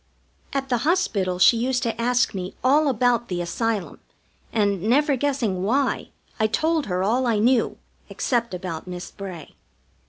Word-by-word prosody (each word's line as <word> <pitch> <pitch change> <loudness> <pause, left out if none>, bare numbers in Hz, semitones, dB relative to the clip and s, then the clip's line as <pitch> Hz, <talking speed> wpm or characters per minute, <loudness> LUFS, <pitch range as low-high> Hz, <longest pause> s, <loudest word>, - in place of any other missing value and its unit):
At 270 -1 -2
the 245 -2 +1
hospital 225 - 0
she 230 +5 +6
used 250 +1 0
to 230 -1 -2
ask 245 +1 +2
me 185 0 -5
all 290 +4 +4
about 245 -2 +2
the 180 -1 -3
Asylum, 205 +4 -2 0.5
and, 200 -4 +1
never 275 - +3
guessing 250 -9 -1
why, 255 +7 0 0.3
I 220 - +3
told 315 +6 0
her 180 -1 -1
all 245 +6 +1
I 225 -2 +2
knew, 235 +3 +2 0.3
except 235 -5 -1
about 180 -2 -6
Miss 180 -1 -7
Bray. 185 -6 -9
230 Hz, 155 wpm, -23 LUFS, 190-260 Hz, 0.5 s, she